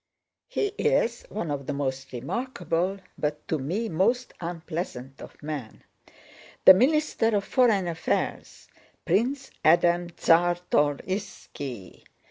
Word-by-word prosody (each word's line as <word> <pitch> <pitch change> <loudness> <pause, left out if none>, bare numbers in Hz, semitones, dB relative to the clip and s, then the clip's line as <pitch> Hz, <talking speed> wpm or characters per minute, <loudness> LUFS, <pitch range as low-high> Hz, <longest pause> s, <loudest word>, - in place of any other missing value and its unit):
"He 410 0 -1
is 240 - +1
one 170 -7 -3
of 140 -2 -4
the 145 - -1
most 135 -1 -3
remarkable, 180 - -2 0.2
but 150 0 -2
to 160 - 0
me 185 +12 -2
most 235 +8 +1
unpleasant 165 -6 -5
of - - -12
men—the 150 +5 0
Minister 275 +2 +2
of 200 - +1
Foreign 220 -8 +3
Affairs, 165 -1 -3 0.4
Prince 265 +5 0
Adam 175 +2 +4
Czartorýski.... 165 - 0
175 Hz, 100 wpm, -26 LUFS, 145-220 Hz, 0.4 s, Adam